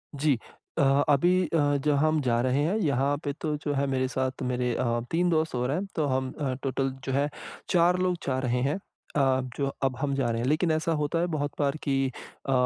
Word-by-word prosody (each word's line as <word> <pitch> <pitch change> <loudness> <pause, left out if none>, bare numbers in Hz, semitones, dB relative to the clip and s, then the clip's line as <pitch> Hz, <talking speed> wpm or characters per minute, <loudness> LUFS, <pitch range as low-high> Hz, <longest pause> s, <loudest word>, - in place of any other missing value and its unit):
जी, 140 -3 +2 0.4
अ, - - +3 0.3
अभी 175 +6 +4
अ, 145 -2 +2
जहाँ 150 +1 +3
हम 155 -1 +1
जा 120 -2 +1
रहे 130 +3 +1
हैं, 170 +7 +1
यहाँ 140 - +1
पे 145 - -2
तो 155 -2 -1
जो 145 0 -2
है 140 0 +1
मेरे 130 -1 0
साथ 130 0 -2
मेरे 125 -1 0
अ, 120 -1 0
3 175 +2 +2
दोस्त 160 -3 +1
और 125 +2 0
हैं, 180 +7 -1
तो 155 - +1
हम 130 0 0
अ, 135 -3 -1
टोटल 135 0 0 0.2
जो 135 - -2
है 140 +2 +2 0.4
4 175 0 +4
लोग 180 -1 +1
जा 130 -1 +1
रहे 125 0 +1
हैं। 160 +7 -2 0.4
अब 130 -2 +2
जो 140 -1 0 0.2
अब 135 -1 +1
हम 140 -1 0
जा 130 -4 0
रहे 115 - -1
हैं 120 - -1
लेकिन 160 +3 +2
ऐसा 160 +1 0
होता 150 +3 0
है 175 - +1
बहुत 145 -1 -1
बार 140 +1 +1
कि 140 -2 +1 0.5
अ, 135 - -1
140 Hz, 230 wpm, -27 LUFS, 130-155 Hz, 0.5 s, अभी